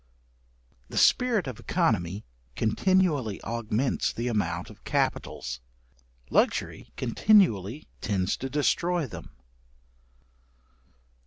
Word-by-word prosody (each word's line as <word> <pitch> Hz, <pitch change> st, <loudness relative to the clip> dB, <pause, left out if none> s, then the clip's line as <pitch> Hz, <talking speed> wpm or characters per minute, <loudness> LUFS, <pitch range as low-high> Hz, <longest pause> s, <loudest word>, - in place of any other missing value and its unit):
§81. -, -, -36 dB
The -, -, -6 dB
spirit 240 Hz, -7 st, +4 dB
of 130 Hz, -5 st, -5 dB
œconomy 105 Hz, -, 0 dB, 0.3 s
continually 145 Hz, -, +1 dB
augments 115 Hz, +3 st, -1 dB
the 120 Hz, +2 st, -3 dB
amount 85 Hz, -6 st, -2 dB
of -, -, -17 dB
capitals, 65 Hz, +1 st, -2 dB, 0.7 s
luxury -, -, 0 dB
continually 130 Hz, -, +3 dB
tends 95 Hz, -3 st, 0 dB
to 135 Hz, -, -5 dB
destroy 170 Hz, +4 st, +1 dB
them. 120 Hz, -, -9 dB
120 Hz, 90 wpm, -27 LUFS, 105-170 Hz, 0.7 s, spirit